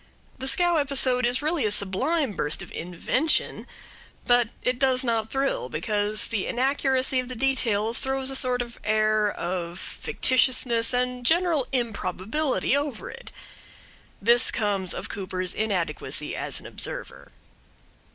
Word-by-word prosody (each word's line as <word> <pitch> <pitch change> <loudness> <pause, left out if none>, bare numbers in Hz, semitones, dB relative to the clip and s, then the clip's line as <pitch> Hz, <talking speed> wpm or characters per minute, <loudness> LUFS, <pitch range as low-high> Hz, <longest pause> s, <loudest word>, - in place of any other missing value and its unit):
The 265 - -3
scow 345 +5 +3
episode 265 -4 +1
is 250 +4 -1
really 310 -2 0
a 215 - +2
sublime 250 - 0
burst 155 -5 -2
of - - -12
invention; 180 - -1 0.6
but 245 -1 +4 0.2
it 250 0 0
does 260 -1 +3
not 225 -3 0
thrill, 270 - -1
because 205 +7 -1
the 210 -4 -2
inaccuracy 265 0 +1
of 255 - -3
the 255 - -6
details 230 -3 +1
throws 265 0 -1
a - - -3
sort 250 -2 +2
of 235 -1 -12
air 215 0 +2
of 175 -1 -4
fictitiousness 250 0 +2
and 250 0 -1
general 325 -2 +2
improbability 240 - -1
over 285 -5 -3
it. - - -11 0.9
This 235 +4 +4
comes 200 -5 -1
of - - -5
Cooper's 185 -2 -4
inadequacy 195 -6 -2
as - - 0
an - - -15
observer. - - -5
245 Hz, 135 wpm, -25 LUFS, 210-270 Hz, 0.9 s, but